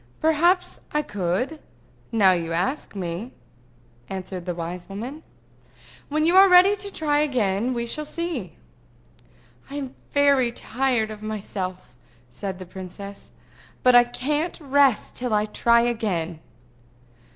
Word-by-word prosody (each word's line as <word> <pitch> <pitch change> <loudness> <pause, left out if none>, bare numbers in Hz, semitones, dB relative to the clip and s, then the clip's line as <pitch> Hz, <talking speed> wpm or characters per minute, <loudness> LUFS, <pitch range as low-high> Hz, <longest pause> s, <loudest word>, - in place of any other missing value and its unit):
"Perhaps 345 +4 +2
I 300 0 +1
could, 205 - -2 0.5
now 205 -5 +5
you 170 -2 -1
ask 190 - -2
me," 185 +5 -4 0.8
answered 185 -1 -6
the 175 - -2
wise 175 +2 -6
woman. 240 +10 -6 0.9
"When 310 +1 +1
you 345 +2 +3
are 390 0 +9
ready 365 +3 +7
to 400 0 -8
try 295 -4 +1
again, 240 -6 +1
we 235 0 -2
shall 305 +6 -3
see." 305 - -4 1.1
"I 280 - -7
am 270 -3 -5 0.2
very 280 -4 +4
tired 240 -2 -1
of 215 -1 -9
myself," 195 -7 -5 0.4
said 195 +3 -5
the 185 - -8
princess. 190 +2 -9 0.5
"But 250 - +6
I 245 0 +8
can't 295 +8 -2
rest 280 -5 +2
till 245 -3 -1
I 210 0 +2
try 235 +2 +3
again." 195 -9 -1
235 Hz, 130 wpm, -24 LUFS, 190-290 Hz, 1.1 s, are